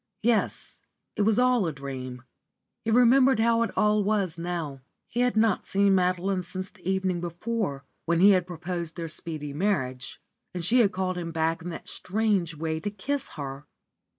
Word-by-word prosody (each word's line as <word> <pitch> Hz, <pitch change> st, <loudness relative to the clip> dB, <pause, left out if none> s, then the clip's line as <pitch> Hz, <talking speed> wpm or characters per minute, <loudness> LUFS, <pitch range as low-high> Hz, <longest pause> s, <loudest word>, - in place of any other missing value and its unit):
Yes, 230 Hz, -1 st, 0 dB, 0.3 s
it -, -, -1 dB
was 215 Hz, +1 st, +3 dB
all 250 Hz, -6 st, +3 dB
a -, -, -1 dB
dream. 130 Hz, -3 st, -7 dB, 0.6 s
He 225 Hz, -, -2 dB
remembered 250 Hz, +2 st, +5 dB
how 230 Hz, 0 st, +3 dB
it 230 Hz, -, +1 dB
all 210 Hz, 0 st, +3 dB
was 195 Hz, -4 st, 0 dB
now. 165 Hz, -5 st, -4 dB, 0.3 s
He 240 Hz, -, -4 dB
had 250 Hz, -2 st, +2 dB
not 220 Hz, -3 st, +2 dB
seen 200 Hz, 0 st, +3 dB
Madeline 185 Hz, +1 st, +1 dB
since 185 Hz, +2 st, -6 dB
the 185 Hz, -, -7 dB
evening 190 Hz, -2 st, 0 dB
before, 175 Hz, -4 st, -3 dB, 0.2 s
when 170 Hz, 0 st, +2 dB
he 200 Hz, +3 st, +8 dB
had 185 Hz, -2 st, +2 dB
proposed 170 Hz, -1 st, -4 dB
their 165 Hz, -1 st, -3 dB
speedy 155 Hz, -2 st, -5 dB
marriage, 135 Hz, -8 st, -1 dB, 0.4 s
and 175 Hz, -2 st, -1 dB
she 245 Hz, +7 st, +4 dB
had 210 Hz, -5 st, +4 dB
called 185 Hz, -1 st, -2 dB
him 165 Hz, -1 st, -4 dB
back 165 Hz, 0 st, 0 dB
in 175 Hz, -, -5 dB
that 165 Hz, -, -8 dB
strange 195 Hz, -5 st, 0 dB
way 160 Hz, +1 st, -2 dB
to 205 Hz, -, -3 dB
kiss 265 Hz, +8 st, -3 dB
her. 140 Hz, 0 st, -6 dB
185 Hz, 180 wpm, -27 LUFS, 165-210 Hz, 0.6 s, he